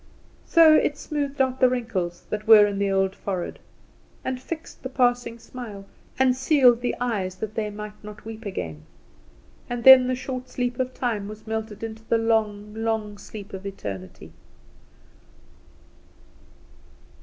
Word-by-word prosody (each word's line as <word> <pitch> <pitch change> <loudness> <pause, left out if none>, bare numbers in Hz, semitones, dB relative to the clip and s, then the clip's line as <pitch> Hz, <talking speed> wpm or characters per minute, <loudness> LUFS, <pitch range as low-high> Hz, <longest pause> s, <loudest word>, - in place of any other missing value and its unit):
So 325 -2 +7
it 295 -1 +3
smoothed 285 -2 -3
out 260 0 0
the 255 - +6
wrinkles 195 -9 -3
that 215 +1 -3
were 215 -2 +9
in 200 -1 -2
the 200 0 +1
old 195 0 +1
forehead, 185 -3 -4 0.7
and 255 -1 -3
fixed 320 +4 -7
the 260 - -5
passing 245 -2 +1
smile, 225 -4 -9 0.3
and 260 -1 +4
sealed 260 -3 +4
the 245 - -1
eyes 205 -7 -2
that 215 +2 -5
they 215 -1 -2
might 210 0 -9
not 210 0 -11
weep 225 0 -8
again; 80 - -5 0.9
and 240 -1 -3
then 265 -1 +10
the 255 - 0
short 255 0 -6
sleep 245 0 -3
of 255 0 -2
time 220 -5 -2
was 215 +1 -10
melted 220 -1 -4
into 220 0 -6
the 230 - +2
long, 215 -2 0
long 220 -2 -2
sleep 205 -1 -10
of 190 0 -6
eternity. 100 - -7
225 Hz, 150 wpm, -24 LUFS, 205-255 Hz, 0.9 s, then